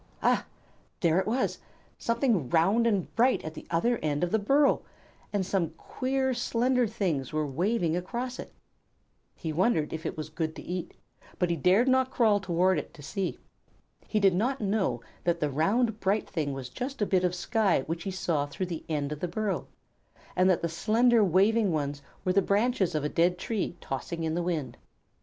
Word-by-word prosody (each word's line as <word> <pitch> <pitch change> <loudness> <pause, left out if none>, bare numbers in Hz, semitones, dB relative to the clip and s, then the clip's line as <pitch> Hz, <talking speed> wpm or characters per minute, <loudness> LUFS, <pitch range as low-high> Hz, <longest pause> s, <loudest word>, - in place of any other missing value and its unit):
Ah! - - +2 0.5
There 170 0 +3
it 190 - -1
was; 250 +4 0 0.4
something 230 - +1
round 195 - +3
and 200 -6 -1
bright 250 +3 +3
at 155 - -5
the - - -10
other 225 +9 +1
end 150 0 -1
of 175 - 0
the 220 - +3
burrow, 275 +7 +3 0.5
and 200 -2 0
some 170 -4 -1
queer, 265 0 -1
slender 245 +1 +1
things 170 - -2
were 155 0 0
waving 170 - 0
across 240 +8 -4
it. - - -7 0.8
He 160 -2 -4
wondered 165 -3 +1
if 160 0 -5
it - - -4
were 155 - -2
good 155 +1 -4
to - - -8
eat, 180 0 -5 0.4
but 180 -1 +1
he - - +1
dared 185 - +3
not 260 0 +3
crawl 220 -5 +3
toward 185 -2 +2
it 150 - -9
to 145 - -12
see. 190 +5 -3 0.7
He 215 - +1
did 195 -2 +4
not 250 +9 0
know 195 - 0 0.2
that 170 -1 +1
the 150 -2 0
round, 215 - +1
bright 200 +2 0
thing 155 -6 -2
was 135 -2 -6
just 270 +2 -5
a - - +3
bit 185 -2 +2
of 180 0 +1
sky 205 - +1
which 165 +5 -4
he 195 - -4
saw 165 -6 -1
through 165 +6 -4
the 170 -3 -5
end 145 -2 -1
of 150 - -4
the 180 - -2
burrow, 205 +3 -2 0.7
and 185 +1 +4
that 180 - +2
the - - +2
slender, 225 +7 +3
waving 200 +3 +3
ones 145 -2 -2 0.2
were 185 - +2
the 200 - +4
branches 200 -3 +1
of 150 - 0
a - - +1
dead 175 +3 +2
tree 190 -3 -3
tossing 165 +5 -4
in 160 -1 -1
the 175 - 0
wind. 155 -9 -2
185 Hz, 195 wpm, -28 LUFS, 160-225 Hz, 0.8 s, did